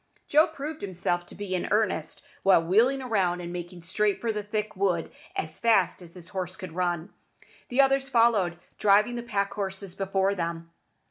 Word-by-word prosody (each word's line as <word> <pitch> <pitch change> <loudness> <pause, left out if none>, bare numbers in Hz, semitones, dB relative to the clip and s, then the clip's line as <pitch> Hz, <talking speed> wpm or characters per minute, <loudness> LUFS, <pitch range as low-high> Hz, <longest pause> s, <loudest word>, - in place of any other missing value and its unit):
Joe 305 +2 +5
proved 310 0 -6
himself 175 -2 -2
to - - -12
be 205 -2 -5
in 180 - -1
earnest 205 -7 0 0.2
by 195 -1 +6
wheeling 235 +11 +2
round 185 -6 +1
and 175 0 -6
making 175 0 -7
straight 205 +3 0
for 230 - -1
the 210 -1 -3
thick 210 +1 -3
wood 185 -4 0 0.2
as 155 0 -4
fast 220 -6 +3
as 170 0 -13
his 175 -2 -11
horse 185 -1 -4
could 185 -4 -8
run. 175 -1 -2 0.6
The 250 +3 +4
others 270 0 +2
followed, 230 -8 +3 0.2
driving 210 +3 +4
the 240 - -3
pack 200 -4 -1
horses 195 -2 -4
before 195 0 0
them. 170 -2 -4
195 Hz, 180 wpm, -27 LUFS, 175-220 Hz, 0.6 s, by